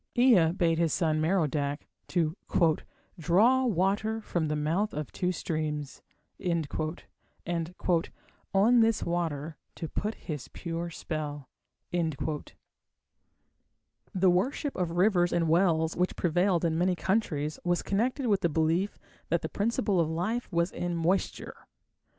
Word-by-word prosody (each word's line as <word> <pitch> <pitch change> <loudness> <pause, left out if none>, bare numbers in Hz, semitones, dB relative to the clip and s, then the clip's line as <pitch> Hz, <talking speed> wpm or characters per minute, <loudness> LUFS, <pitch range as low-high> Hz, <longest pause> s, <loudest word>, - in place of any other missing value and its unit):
Ea 225 -10 +6
bade 170 -3 +1
his 165 -2 +2
son, 155 -3 +1
Merodach, 150 -4 0 0.2
to 165 -3 0 0.8
"draw 220 +11 +4
water 205 +3 +1
from 175 -7 -2
the 150 - -1
mouth 165 +8 0
of 150 -2 -4
two 180 0 -1
streams", 155 -4 -3 0.4
and 170 -5 -1 1.8
"on 220 +6 +5
this 225 -1 +3
water 160 -3 -2 0.2
to 165 - -5
put 210 +7 -3
his 150 -6 -6
pure 170 0 -4
spell". 150 -4 -5 0.4
The 160 -3 -2 1.8
worship 265 - 0
of 180 -3 -1
rivers 175 0 +3
and 170 -1 +1
wells 165 -1 +2
which 180 +1 0
prevailed 175 +1 +2
in 165 0 +1
many 180 +1 +2
countries 160 -7 -1
was 175 0 +1
connected 250 +7 0
with 205 -4 +2
the 170 - +2
belief 165 +5 +1 0.3
that - - +1
the - - -3
principle 210 -2 0
of 160 -2 +2
life 210 +10 -2
was 170 +1 +1
in 175 -1 -3
moisture. 170 +4 -2
175 Hz, 125 wpm, -29 LUFS, 160-195 Hz, 1.8 s, Ea